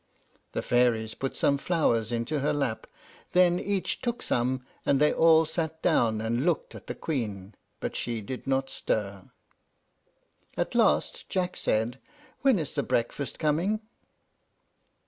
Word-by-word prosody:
The - - -2
fairies 120 -3 +2
put 135 - -4
some 140 -1 +2
flowers 120 - +1
into 120 +6 -1
her 140 - +1
lap, 135 -6 -2 0.5
then 180 -1 +5
each 200 -2 -2
took 240 -1 -2
some, 125 +1 0 0.2
and 140 - +2
they 150 +1 +4
all 160 0 +6
sat 160 0 -3
down 115 -10 +3
and 115 +3 0
looked 170 -2 0
at - - -11
the - - -4
Queen, 105 - -3 0.3
but - - -4
she 115 -2 -2
did 125 +6 -7
not 135 0 0
stir. 100 -3 -2 1.3
At - - -1
last - - +2
Jack 180 -1 -1
said, 115 +4 0 0.4
"When 265 -5 +4
is 155 -5 -3
the - - 0
breakfast 120 +4 -2
coming?" 170 +8 +1
135 Hz, 145 wpm, -28 LUFS, 115-165 Hz, 1.3 s, all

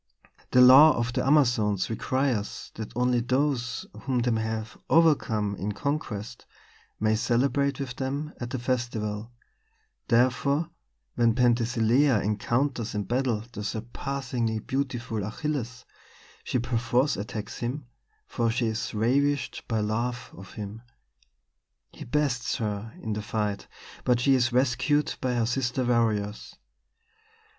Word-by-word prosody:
The 125 - +5
law 135 +5 +9
of 120 0 -1
the - - 0
Amazons 120 -9 +3
requires 120 -1 -2
that 110 -1 -7
only 125 0 +2
those 125 0 0
whom 130 +2 -2
they 120 0 +1
have 110 0 -4
overcome 120 -11 +3
in 105 +2 -3
conquest 115 -4 -4 0.5
may 110 0 +2
celebrate 140 +4 +1
with 130 -3 -5
them 140 +4 -3
at 120 - -4
the 130 - -3
festival; 120 -3 -2 0.8
therefore, 130 +6 +2 0.4
when 115 -2 +2
Penthesilea 120 +1 +3
encounters 115 +4 -1
in 105 - -1
battle 120 0 0
the 105 - -6
surpassingly 120 +1 -3
beautiful 120 -2 -3
Achilles, 125 +2 -4 0.6
she - - -1
perforce 120 +3 +1
attacks 105 0 -6
him, 125 +4 -3 0.4
for 115 - -1
she 120 +1 0
is 110 0 -3
ravished 135 +5 +1
by 110 -2 0
love 120 +3 -2
of 95 0 -12
him. 105 +1 -7 1.1
He - - -10
bests 125 -2 0
her 105 0 -3
in 110 - -2
the 105 - -3
fight, 105 -1 -3 0.4
but 125 -1 +2
she 135 +2 +4
is 125 -1 +2
rescued 130 +4 +2
by 125 -1 0
her 115 -1 +1
sister 125 +1 -1
warriors. 110 -4 0
120 Hz, 125 wpm, -27 LUFS, 110-130 Hz, 1.1 s, law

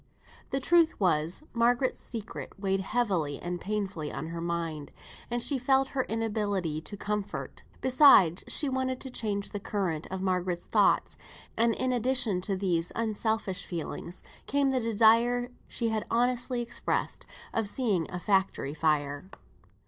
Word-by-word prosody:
The 270 - 0
truth 335 +4 +3
was, 170 - +1
Margaret's 245 +2 +2
secret 225 -3 -7
weighed 195 -1 0
heavily 190 - 0
and 175 0 -4
painfully 195 -7 -3
on 160 - -5
her 165 0 -5
mind, 165 -3 -3 0.4
and 240 0 -1
she 280 -3 +1
felt 265 +1 +3
her 260 -2 -1
inability 205 -8 -1
to 205 +5 -7
comfort; 210 0 -4 0.2
besides, 255 - +6
she 295 - 0
wanted 260 -1 -1
to 265 - -5
change 205 -4 -3
the 205 - -4
current 190 -7 -2
of 190 - -4
Margaret's 180 -2 -1
thoughts; - - +2 0.4
and 230 0 +2
in 255 0 0
addition 245 -5 +1
to 195 +1 -1
these 175 -3 0
unselfish 220 -3 -1
feelings, 170 +1 -6 0.2
came 280 0 +2
the 260 - +1
desire 230 +2 +3 0.2
she 230 -2 -1
had 220 -1 -2
honestly 245 +1 +1
expressed, 235 - -2 0.3
of 225 -3 0
seeing 205 - 0
a 180 - -4
factory 190 -6 +1
on 145 - -6
fire. 150 +1 0
210 Hz, 150 wpm, -29 LUFS, 180-245 Hz, 0.4 s, besides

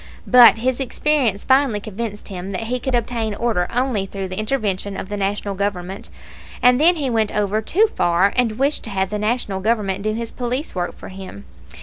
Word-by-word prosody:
But 245 -2 +8
his 255 +3 -1
experience 265 -5 0
finally 260 -5 +3
convinced 215 +1 -6
him 190 0 -6
that 190 - -3
he 250 +3 -2
could 260 +1 -1
obtain 230 -2 -1
order 210 -6 0
only 245 -6 0
through 195 -1 -5
the 185 +2 -4
intervention 205 -4 -2
of 190 - -6
the 205 - -3
National 200 0 -2
Government; 195 +1 -3 0.5
and 250 +2 +4
then 345 +3 +6
he 280 -6 -2
went 220 -2 +1
over 210 +1 0
too 390 - +3
far 185 - +2
and 245 -3 +2
wished 280 +3 +1
to - - -6
have 190 -1 -1
the 210 - -2
National 210 -3 -1
Government 200 -2 0
do 215 +1 -1
his 230 0 -4
police 250 +4 -3
work 175 -1 -3
for - - -10
him. 185 - -10
215 Hz, 200 wpm, -20 LUFS, 195-245 Hz, 0.5 s, But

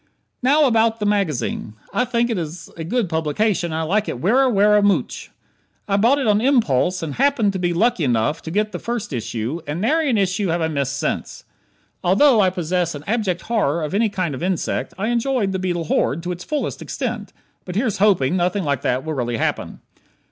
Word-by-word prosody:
Now, 290 +4 +4
about 225 -2 +2
the 210 - -2
magazine. 160 - -1 0.2
I 245 - +1
think 240 -1 0
it 225 - -1
is 165 +1 -7
a 165 - -6
good 230 +5 0
publication 170 +3 0
and 160 - -2
I - - -1
like 200 +6 0
it 120 - -4
werra, 250 - +3
werra 210 0 +4
mooch. 205 -1 0 0.6
I 200 - +1
bought 235 +8 +4
it 275 - -1
on 210 -1 +3
impulse 185 - +2
and 150 -3 -4
happened 265 -7 +2
to 190 - -3
be 175 -1 0
lucky 210 +2 +1
enough 125 +3 +1
to - - -7
get 210 +5 0
the 175 - -5
first 235 -7 -4
issue, 120 +5 -3
and 150 +3 -3
nary 300 - +1
an 235 - +2
issue 195 0 0
have 170 0 0
I 160 -1 0
missed 140 -2 -2
since. - - -3 0.6
Although 220 +6 +5
I 190 - +4
possess 175 -2 -1
an 145 - -8
abject 200 -6 -1
horror 170 -9 0
of 150 - -4
any 220 +2 +2
kind 185 -6 -2
of 130 - -6
insect, 180 -1 -1
I 210 +4 -1
enjoyed 240 -3 0
"The 190 - -2
Beetle 175 -2 -1
Horde" 155 0 0
to 180 0 -2
the 175 - -9
fullest 300 -1 -3
extent. - - -4 0.3
But 180 - -7
here's 220 -2 0
hoping 185 -7 +3
nothing 180 +2 0
like 140 -4 -1
that 130 -1 -1
will 160 - -2
really 120 -4 -2
happen. - - -2
190 Hz, 210 wpm, -21 LUFS, 160-225 Hz, 0.6 s, Although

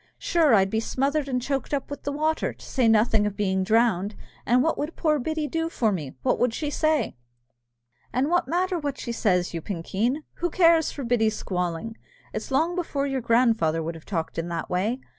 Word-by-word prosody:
Sure, 320 -8 +3
I'd 195 -1 +3
be 220 - +1
smothered 275 +5 0
and 250 -1 0
choked 275 +3 -2
up 275 0 -5
with 285 - -5
the 285 - -1
water, 310 +2 0
to - - -14
say 255 -4 +1
nothing 220 -1 +4
of 205 - -5
being 190 -2 +1
drowned! 215 -2 +2 0.3
And 250 +2 +4
what 325 - +1
would 300 +3 -4
poor 305 -3 +1
Biddy 310 +3 -2
do 325 +2 -1
for 225 -9 +1
me, 165 -8 -3
and 130 - -12
what - - +1
would 245 -2 +1
she 295 -2 -2
say?" 310 - +1 0.9
"And 255 +4 +1
what 350 -1 +1
matter 360 +3 0
what 285 -3 -3
she 235 - -5
says, 180 -7 +1
you 165 - -3
pinkeen? 205 - -2
Who 350 - -1
cares 330 -2 +4
for 280 - -6
Biddy's 225 -3 +1
squalling? 180 +4 -3 0.4
It's - - -4
long 320 +6 +1
before 305 -6 -1
your 270 -2 -1
grandfather 225 -9 +2
would 165 +2 -3
have 165 -1 -12
talked 165 -4 -3
in 165 - -3
that 170 -1 -4
way. 210 +8 0
245 Hz, 210 wpm, -25 LUFS, 200-300 Hz, 0.9 s, nothing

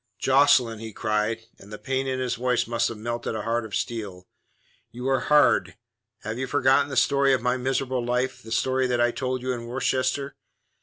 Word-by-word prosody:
"Jocelyn," 130 -4 +3
he 110 -1 -8
cried, 110 +1 -1
and 100 - -15
the 105 - -6
pain 135 +2 -2
in 130 -1 -2
his 130 -1 -1
voice 125 0 0
must 115 0 0
have 115 - -6
melted 120 +1 -4
a 110 - -3
heart 115 0 -1
of 110 - -6
steel, 100 -6 -4 0.6
"you 125 +3 -6
are 135 -1 +2
hard. 150 0 +3 0.4
Have 110 +3 -5
you 130 - -2
forgotten 140 +1 +3
the 135 - -4
story 140 +1 +3
of 130 - +1
my 125 0 +2
miserable 130 0 -1
life, 125 +2 -1
the 110 - -12
story 130 +3 +1
that 125 -1 0
I 120 0 +3
told 130 0 -3
you 130 0 -1
in 115 -1 -6
Worcester? 130 +2 -1
125 Hz, 200 wpm, -25 LUFS, 115-130 Hz, 0.6 s, Jocelyn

